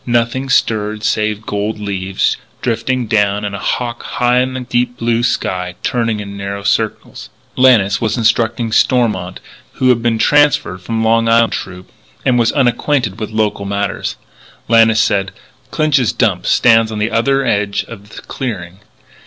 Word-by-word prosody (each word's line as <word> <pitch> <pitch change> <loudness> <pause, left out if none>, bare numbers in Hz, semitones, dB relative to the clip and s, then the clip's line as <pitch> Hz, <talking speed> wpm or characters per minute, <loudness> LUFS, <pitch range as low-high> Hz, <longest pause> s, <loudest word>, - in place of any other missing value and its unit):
Nothing 120 +2 -1
stirred 105 -3 0
save 105 0 -1
gold 105 +2 -3
leaves 95 -2 -1 0.3
drifting 120 +2 -1
down, 105 -1 +1
and 100 - -4
a 100 - -5
hawk 120 +3 -2
high 125 0 +1
in 130 +1 -1
the 130 - -3
deep 125 0 -1
blue 115 0 0
sky 90 -6 -2
turning 115 -3 -1
in 100 -1 -7
narrow 100 0 -5
circles. 100 - -2 0.3
Lannis 110 -7 +4
was 110 +1 -1
instructing 115 0 +1
Stormont, 110 -7 +1 0.3
who 130 - +1
had 120 -2 +3
been 115 -1 +1
transferred 145 -8 +2
from 110 +3 -2
the - - +1
Long 115 0 +2
Island 115 0 +3
Troop, 90 -1 -7 0.3
and 125 -2 +3
who - - +2
was 115 - +2
unacquainted 125 -4 0
with 110 - -4
local 110 -2 -1
matters. 100 0 -3 0.5
Lannis 115 -1 +4
said: 95 -2 +1 0.4
"Clinch's 145 -6 +1
dump 100 -7 0
stands 115 -1 +4
on 110 - -4
the 105 +2 -1
other 135 +4 +1
edge 105 -3 0
of 105 -2 -11
the - - -11
clearing. 95 -8 -6
115 Hz, 160 wpm, -16 LUFS, 100-120 Hz, 0.5 s, Lannis